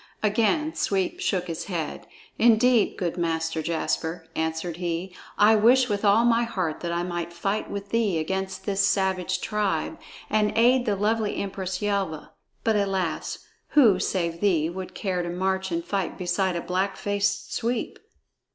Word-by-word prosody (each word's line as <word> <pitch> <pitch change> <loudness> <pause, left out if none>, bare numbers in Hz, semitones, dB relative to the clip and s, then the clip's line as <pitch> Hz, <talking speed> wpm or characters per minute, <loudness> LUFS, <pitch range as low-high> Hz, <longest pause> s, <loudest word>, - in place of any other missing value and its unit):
Again 230 +9 +2
Sweep 190 -2 -1
shook 180 -2 0
his 165 -2 -5
head. 165 -6 -4 0.3
"Indeed, 235 0 +4
good 175 -1 -2
Master 165 -1 -1
Jasper," 165 0 -2
answered 160 +1 -2
he, 175 +1 -3 0.2
"I 215 +2 +6
wish 245 +4 +5
with 205 0 -1
all 210 +3 +5
my 235 -1 +4
heart 185 -9 -2
that 170 - -3
I 170 0 -1
might 175 -1 -3
fight 195 +5 -2
with 200 0 -5
thee 220 -6 +1
against 190 +4 -3
this 195 -1 +1
savage 190 -2 +1
tribe 210 -2 -1 0.3
and 210 -1 +1
aid 245 +2 +4
the 205 - +2
lovely 210 +1 0
Empress 190 -1 -4
Yelva; 195 -7 -2 0.3
but 225 -1 +2
alas! 195 -4 -1 0.3
Who, 220 -10 +7
save 170 -4 -1
thee, 170 -6 +2
would 185 +1 -7
care 185 -4 -1
to 175 - -4
march 190 +1 -1
and 170 0 -2
fight 195 -1 -2
beside 180 0 0
a 170 - -2
black 190 +3 -1
faced 205 0 -1
sweep?" 235 0 -2
190 Hz, 160 wpm, -25 LUFS, 175-210 Hz, 0.3 s, Who